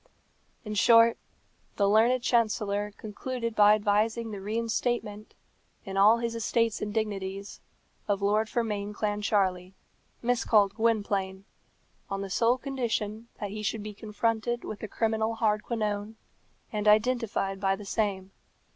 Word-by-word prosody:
In 215 - -4
short, 230 +2 +5 0.6
the 200 - +2
learned 235 +4 +3
chancellor 210 -3 +1
concluded 230 +2 -5
by 210 0 +7
advising 215 +2 0
the 200 -2 -6
reinstatement, 220 0 -2 0.5
in 195 -1 -6
all 205 +4 +6
his 235 0 -2
estates 230 -1 0
and 210 - -3
dignities, 200 -2 -4 0.5
of 200 -1 +1
Lord 215 +2 +2
Fermain 210 -3 -2
Clancharlie, 200 -3 0 0.5
miscalled 220 -4 +3
Gwynplaine, 200 -4 -1 0.6
on 195 0 -3
the 195 -1 -6
sole 235 +5 +3
condition 235 -5 -3
that 205 -2 -4
he 215 +1 -5
should 210 0 -2
be 210 0 -6
confronted 225 +3 -2
with 215 - -6
the 215 - -5
criminal 220 +1 -1
Hardquanonne, 215 -1 -1 0.6
and 210 0 -1
identified 215 -3 +2
by 195 0 +1
the 205 +1 -10
same. 195 -2 -2
215 Hz, 130 wpm, -28 LUFS, 205-230 Hz, 0.6 s, by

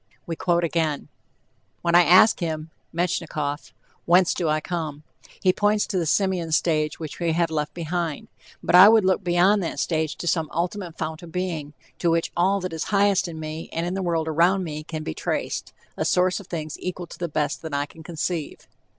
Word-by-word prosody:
We 165 - -4
quote 175 0 +1
again: 160 -3 -1 0.7
"When 170 -1 +1
I 175 - +8
ask 185 +5 +6
him 160 -2 -3 0.2
(Metchnikoff) 165 -4 -2 0.3
whence 180 +1 +4
do 170 -3 -1
I 155 0 +2
come, 155 -3 -4 0.4
he 185 - +4
points 210 +1 +2
to 190 - -1
the 165 - -1
simian 185 -2 +1
stage 155 -1 +1
which 155 -3 -7
we 170 -2 +1
have 170 0 +1
left 150 -1 -2
behind; 170 -2 -3 0.4
but - - -1
I 185 +3 +10
would 220 -3 +5
look 190 +1 +2
beyond 180 +4 +3
that 170 - -3
stage 160 -2 -1
to - - -7
some 160 -1 0
ultimate 175 0 -3
fount 160 0 -4
of 170 -2 -11
being, 165 -5 -3 0.3
to 170 - +2
which 165 0 +1
all 190 +3 +2
that 185 -2 -4
is 160 - -3
highest 200 -2 +2
in 160 -2 -7
me 155 +1 -6
and 165 +1 -2
in 175 - -2
the 195 - -2
world 165 -3 0
around 175 +5 +3
me 155 -2 -5
can 155 0 -6
be - - -4
traced, - - -3 0.2
a - - -1
source 180 +2 +2
of 200 - -12
things 155 -3 -5
equal 180 -1 -4
to - - -13
the 175 -1 -2
best 150 0 -1
that 160 -3 -5
I 140 0 0
can 160 +2 -15
conceive." 165 -1 -4
170 Hz, 205 wpm, -24 LUFS, 155-180 Hz, 0.7 s, I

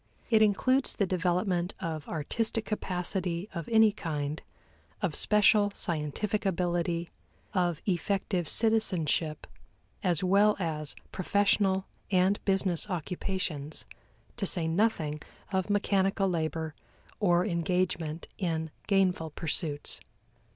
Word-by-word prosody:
It 220 -1 +5
includes 255 +6 +3
the 200 - +2
development 180 0 0
of 160 -4 -4
artistic 220 +8 -2
capacity 180 -2 -2
of 170 -3 -5
any 220 -1 +6
kind, 150 -6 -3 0.6
of - - -1
special 210 -1 +4
scientific 170 +6 -2
ability, 175 -2 0 0.4
of 175 -4 0
effective 185 -1 0
citizenship, 180 -9 +1 0.6
as 180 -4 +1
well 200 +3 +4
as 155 -5 -2 0.2
professional 195 0 +2 0.2
and 190 +1 +2
business 190 -1 +2
occupations, 175 -4 -3 0.5
to 195 - -1
say 170 -3 +2
nothing 160 -5 +1 0.3
of 190 0 0
mechanical 195 -1 +2
labor 160 -2 -2 0.5
or 180 -3 +3
engagement 170 -3 -1
in 160 -4 -1 0.2
gainful 185 -5 +2
pursuits. 150 -1 -1
180 Hz, 100 wpm, -29 LUFS, 165-200 Hz, 0.6 s, any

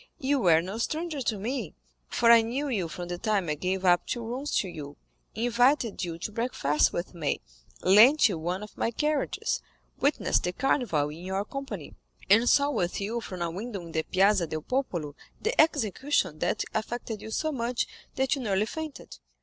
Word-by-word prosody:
You 285 -2 +1
were 165 -6 +4
no 195 +5 -5
stranger 310 +3 -2
to 225 -4 -1
me, 225 - -4 0.3
for 230 - +4
I 230 -1 +8
knew 250 +6 -2
you 195 -9 -1
from 175 +3 -6
the 175 0 -4
time 205 -4 0
I - - +2
gave 185 +5 -2
up 175 -1 +4
two 235 -2 -3
rooms 260 +6 -4
to 195 - +1
you, 145 -5 -8 0.4
invited 245 0 +2
you 170 -2 -4
to 180 - -5
breakfast 210 - +1
with 175 +2 -4
me, 160 -5 -1 0.4
lent 225 +12 +7
you 185 -7 -3
one 180 +5 -3
of 210 - -11
my - - 0
carriages, 300 +5 -1 0.4
witnessed 285 +2 +2
the 180 - -1
Carnival 210 - +1
in 160 +4 -9
your 190 +2 -2
company, 275 +4 -6 0.4
and 230 +4 +6
saw 285 0 +4
with 180 -10 -1
you 220 +4 -2
from 185 -5 -5
a 170 - -2
window 205 +4 -5
in 170 -1 -10
the 160 - 0
Piazza 190 +1 +3
del 155 0 -4
Popolo 175 - -2 0.3
the 455 +3 +3
execution 260 - +1
that 175 +6 0
affected 225 0 -3
you - - -7
so 310 +7 -1
much 240 -3 -1 0.3
that 265 0 +1
you 275 - -5
nearly 205 -3 +1
fainted. 315 +4 -7
215 Hz, 190 wpm, -28 LUFS, 175-255 Hz, 0.4 s, I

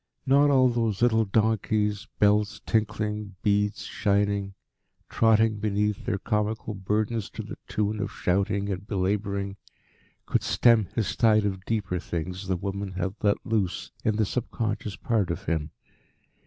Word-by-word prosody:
Not 140 +2 +5
all 130 -2 +5
those 115 -3 0
little 110 -2 +4
donkeys, 105 0 +1
bells 105 0 +3
tinkling, 105 -2 -1
beads 105 0 +1
shining, 100 -1 0 0.5
trotting 110 -1 +3
beneath 105 0 0
their 100 - +1
comical 105 +1 -1
burdens 105 +3 -1
to - - -7
the - - -7
tune 105 0 -1
of 100 -1 -2
shouting 100 +2 0
and 95 +1 -5
belabouring, 100 0 -1 0.7
could - - +1
stem 115 -5 +4
this 105 -5 -1
tide 110 -3 +4
of 95 -2 -3
deeper 100 -5 -1
things 90 +3 -5
the 95 -1 0
woman 100 +1 -4
had 95 +1 -2
let 100 -1 +1
loose 105 -6 -1
in 110 - +1
the 110 0 +2
subconscious 110 -2 -3
part 105 -6 0
of 85 +2 -3
him. 80 -3 -1
105 Hz, 140 wpm, -26 LUFS, 100-110 Hz, 0.7 s, Not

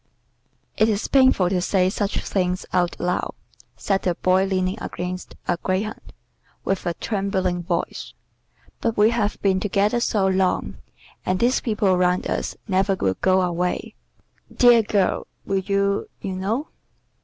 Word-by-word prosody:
"It 220 - +4
is 210 -1 -1
painful 260 -9 +4
to 185 -2 +1
say 185 0 +2
such 205 0 -2
things 180 -2 -1
out 175 -1 +1
loud," 180 0 -1 0.4
said 195 -1 0
the 180 -2 0
Boy 185 +2 +2
leaning 190 +1 -1
against 180 +1 -5
a 175 - +1
greyhound, 190 +5 -3 0.5
with 195 -2 -1
a 170 - -1
trembling 190 -4 -1
voice, 170 0 -3 0.7
"but 230 -1 -1
we 210 +2 +5
have 215 -3 -1
been 190 -2 +3
together 205 +4 +1
so 210 -4 +1
long, 190 -1 0 0.5
and 185 0 0
these 245 +2 +2
people 210 -5 +1
round 180 0 +1
us - - -2
never 195 0 +2
will 95 - -1
go 185 0 +4
away. 180 0 -2 0.6
Dear 240 -2 +6
girl, 205 -3 0 0.2
will 195 0 0
you? 200 +1 0
you 190 - -4
know." 220 +10 -2
190 Hz, 145 wpm, -23 LUFS, 185-210 Hz, 0.7 s, Dear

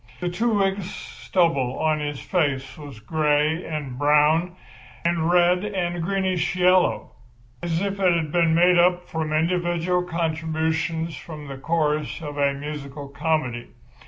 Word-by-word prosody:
The 180 - -2
two 220 +5 0
weeks' 195 -1 0
stubble 155 -9 -1
on 155 -1 +1
his 145 -2 -4
face 140 -7 -1
was 145 -6 -10
grey 150 +5 +1
and 140 -5 -5
brown 150 +4 +3 0.5
and 170 -1 +1
red 180 +1 +4
and 175 -4 -2
greenish 190 0 0
yellow—as 145 -6 0
if 200 0 -3
it 185 -2 +4
had 165 -3 0
been 165 -1 +3
made 175 +1 +5
up 180 0 +3
from 160 -1 -3
individual 175 +2 +1
contributions 160 -1 -2
from 150 -1 -9
the 135 -1 -7
chorus 150 +1 -1
of 145 -2 -6
a 140 -1 +3
musical 145 -1 -7
comedy. 140 -5 -1
160 Hz, 135 wpm, -23 LUFS, 150-175 Hz, 0.5 s, made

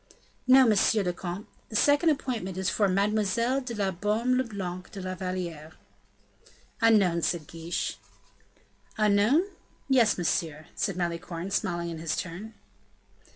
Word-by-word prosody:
"No, 260 0 +8
monsieur 215 -1 +3
le 180 -1 -1
comte; 180 +3 -6 0.2
the 220 - -8
second 290 +8 +4
appointment 235 - -2
is 190 -1 0
for 205 - +2
Mademoiselle 210 +6 +1
de 245 -3 -6
la 200 -2 0
Baume 210 +7 0
le 255 - +2
Blanc 185 -6 -6
de 200 - -8
la 185 0 -4
Valliere." 175 -4 -5 1.1
"Unknown," 200 -7 +4
said 170 0 0
De - - -16
Guiche. 165 +1 -3 1.0
"Unknown? 215 - +4 0.4
yes, 245 -6 +4
monsieur," 160 -3 -1
said 195 -3 -1
Malicorne, 170 +1 -3
smiling 170 -2 -1
in 165 - -6
his 160 -1 -2
turn. 185 +6 -6
195 Hz, 140 wpm, -28 LUFS, 175-225 Hz, 1.1 s, No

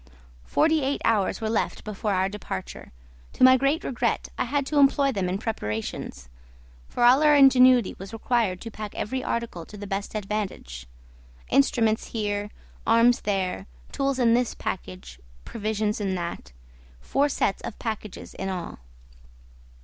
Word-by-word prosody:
Forty 315 0 +2
eight 275 +1 -1
hours 215 -3 +1
were 220 - -1
left 225 - -1
before 210 0 -3
our 190 0 +1
departure; 195 - -7 0.4
to - - 0
my 260 0 +9
great 275 +5 +1
regret 250 - -1
I - - -1
had 285 -1 -1
to 295 +1 +1
employ 275 0 +4
them 195 -6 -2
in 185 - -1
preparations; 105 - -5 0.6
for - - -1
all 250 +4 +6
our 300 -1 +6
ingenuity 255 -4 +6
was 195 +2 -8
required 225 -4 0
to 230 - -7
pack 215 -1 -7
every 260 +4 -3
article 235 -8 -3
to 210 - -11
the 205 - -7
best 200 +1 -4
advantage; 195 - -4 0.6
instruments 220 - +2
here, 205 -2 -2 0.4
arms 230 +2 +4
there, 190 - -2 0.2
tools 275 -1 -1
in 235 -3 +4
this 245 0 +1
package, 185 - -6 0.3
provisions 215 -1 -2
in 195 -2 -1
that: 170 - -5 0.5
four 280 - +1
sets 200 - 0
of 235 - -7
packages 220 -3 -6
in 195 - -4
all. 180 - -5
215 Hz, 150 wpm, -25 LUFS, 195-255 Hz, 0.6 s, my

